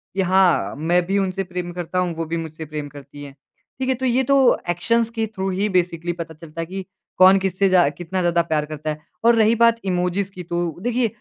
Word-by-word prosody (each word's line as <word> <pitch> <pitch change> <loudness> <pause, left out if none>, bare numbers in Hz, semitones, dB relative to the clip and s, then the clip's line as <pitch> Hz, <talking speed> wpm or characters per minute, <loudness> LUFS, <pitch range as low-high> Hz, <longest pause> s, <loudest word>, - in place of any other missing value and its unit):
कि 195 - +1
हाँ, 185 - +2
मैं 170 +4 +1
भी 195 +3 0
उनसे 195 0 -1
प्रेम 180 -1 -5
करता 180 +1 -3
हूँ, 180 -2 0
वो 165 0 -3
भी 165 +1 -3
मुझसे 160 -1 -6
प्रेम 150 -1 -6
करती 145 0 -12
हैं। 140 -1 -11 0.4
ठीक 260 0 -1
है? 260 - +2
तो 260 - -4
ये 255 +1 +2
तो 275 +2 +2 0.3
एक्शन्स 230 +7 +1
के 225 -1 -2
थ्रू 190 0 -2
ही 200 +3 -1
बेसिकली 175 -2 0
पता 160 -1 -5
चलता 165 +1 -8
है - - -3
कि 190 +2 -6 0.3
कौन 190 +1 +7
किससे 190 0 +1
ज़्या 180 -5 +5
कितना 175 +5 -5
ज़्यादा 170 -1 +2
प्यार 155 -3 -1
करता 155 0 -6
है 150 0 -4 0.3
और 235 0 +6
रही 225 0 +4
बात 230 0 +4
इमोजीज़ 180 +2 -1
की 185 -2 -8
तो 170 -2 -3
देखिए 245 0 +1
180 Hz, 230 wpm, -21 LUFS, 165-195 Hz, 0.4 s, कौन